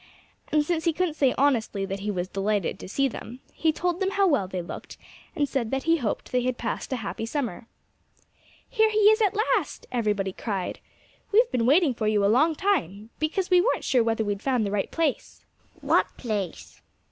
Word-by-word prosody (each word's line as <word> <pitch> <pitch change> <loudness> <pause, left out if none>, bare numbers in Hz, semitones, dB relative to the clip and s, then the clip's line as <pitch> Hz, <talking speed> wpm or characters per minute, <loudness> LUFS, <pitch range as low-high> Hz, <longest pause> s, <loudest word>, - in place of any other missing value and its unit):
And 300 0 +3
since 330 0 -1
he 335 - +3
couldn't 350 0 0
say 275 -4 +2
honestly 230 -8 +1
that 195 0 -4
he 205 +2 -4
was 180 -3 -2
delighted 200 0 -1
to - - -9
see 275 +7 +1
them, 245 0 -8
he 320 - +1
told 350 +2 -2
them 385 -1 +1
how 395 0 +2
well 285 - +2
they 185 -1 -4
looked 170 - -9 0.4
and 290 -3 +1
said 260 -5 -2
that 270 +2 -2
he 330 +1 +3
hoped 235 -8 -3
they 250 - +2
had 250 0 -1
passed 235 - -4
a - - +1
happy 225 -1 -5
summer. 240 - -3 1.0
"Here 440 -3 +3
he 430 - -1
is 435 +1 +2
at 415 -1 +2
last!" 435 +3 0
everybody 210 -5 0
cried. 195 -4 -4 0.5
"We've 465 +4 +4
been 235 -1 +1
waiting 300 0 +4
for 220 -2 -2
you 215 -1 +2
for - - +2
a - - +4
long 305 +8 +3
time, 230 - -1
because 355 +5 -1
we 360 -1 +6
weren't - - 0
sure 250 -3 +3
whether 225 -1 0
we'd 205 -1 -3
found 250 -5 +1
the 200 - -2
right 200 -1 -1
place." 320 -5 -2 0.4
"What - - +3
place?" 185 - -5
250 Hz, 205 wpm, -26 LUFS, 205-330 Hz, 1.0 s, we